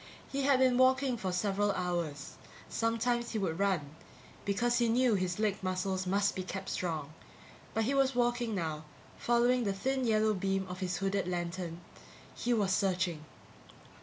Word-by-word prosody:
He 275 Hz, -, -1 dB
had 275 Hz, -1 st, +4 dB
been 255 Hz, -1 st, +3 dB
walking 260 Hz, 0 st, +4 dB
for 190 Hz, -5 st, -3 dB
several 200 Hz, +2 st, +1 dB
hours; 170 Hz, -5 st, -3 dB, 0.4 s
sometimes 235 Hz, +1 st, 0 dB
he -, -, 0 dB
would 185 Hz, -4 st, -1 dB
run, 170 Hz, -7 st, 0 dB, 0.5 s
because 240 Hz, +5 st, +1 dB
he 235 Hz, -1 st, +2 dB
knew 245 Hz, 0 st, +3 dB
his 185 Hz, -3 st, 0 dB
leg 210 Hz, -2 st, 0 dB
muscles 185 Hz, 0 st, -1 dB
must 200 Hz, +2 st, +2 dB
be 190 Hz, -, -2 dB
kept 190 Hz, +1 st, -5 dB
strong, 155 Hz, -4 st, -3 dB, 0.6 s
but 225 Hz, -, +2 dB
he 255 Hz, +6 st, 0 dB
was 270 Hz, -1 st, +2 dB
walking 240 Hz, -2 st, +1 dB
now, 160 Hz, -4 st, -3 dB, 0.4 s
following 240 Hz, +1 st, +3 dB
the 200 Hz, -3 st, 0 dB
thin 265 Hz, +7 st, -1 dB
yellow 215 Hz, -1 st, +3 dB
beam 195 Hz, 0 st, -1 dB
of 180 Hz, 0 st, -7 dB
his 180 Hz, -2 st, -2 dB
hooded 195 Hz, -1 st, -1 dB
lantern. 175 Hz, -1 st, -3 dB, 0.5 s
He 245 Hz, -, -2 dB
was 205 Hz, -5 st, +2 dB
searching. 180 Hz, -5 st, 0 dB
200 Hz, 165 wpm, -32 LUFS, 180-240 Hz, 0.6 s, had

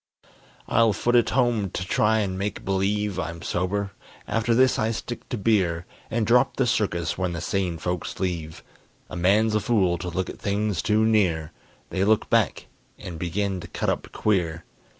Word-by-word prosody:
I'll 115 Hz, -1 st, +4 dB
foot 120 Hz, +5 st, +1 dB
it 115 Hz, -2 st, +4 dB
home, 120 Hz, -6 st, +1 dB
to 90 Hz, -, -4 dB
try 110 Hz, +3 st, +2 dB
and 95 Hz, -2 st, -2 dB
make 100 Hz, +1 st, -4 dB
believe 100 Hz, 0 st, 0 dB
I'm 85 Hz, -1 st, -5 dB
sober. 100 Hz, +3 st, -1 dB, 0.4 s
After 115 Hz, +1 st, +1 dB
this 130 Hz, +1 st, +4 dB
I 110 Hz, -, +1 dB
stick 115 Hz, +1 st, -5 dB
to 125 Hz, -, -2 dB
beer, 95 Hz, -6 st, +1 dB, 0.2 s
And 115 Hz, -1 st, 0 dB
drop 125 Hz, +3 st, +3 dB
the 130 Hz, -, +2 dB
circus 95 Hz, -8 st, 0 dB
when 90 Hz, -2 st, -1 dB
the 85 Hz, -, -3 dB
sane 90 Hz, 0 st, -1 dB
folks 90 Hz, +1 st, -4 dB
leave. 85 Hz, -4 st, -3 dB, 0.5 s
A -, -, -5 dB
man's 105 Hz, +5 st, +3 dB
a 110 Hz, -, +3 dB
fool 95 Hz, -7 st, +1 dB
to 90 Hz, 0 st, -4 dB
look 90 Hz, +1 st, -2 dB
at -, -, -8 dB
things 100 Hz, -2 st, -1 dB
too 110 Hz, +1 st, +2 dB
near: 90 Hz, -8 st, +2 dB, 0.4 s
They 95 Hz, -, 0 dB
look 110 Hz, +2 st, +2 dB
back -, -, +2 dB, 0.3 s
and 85 Hz, -3 st, -8 dB
begin 95 Hz, +2 st, -1 dB
to -, -, -8 dB
cut -, -, -2 dB
up -, -, -4 dB
queer. 85 Hz, -6 st, 0 dB
100 Hz, 180 wpm, -25 LUFS, 90-110 Hz, 0.5 s, I'll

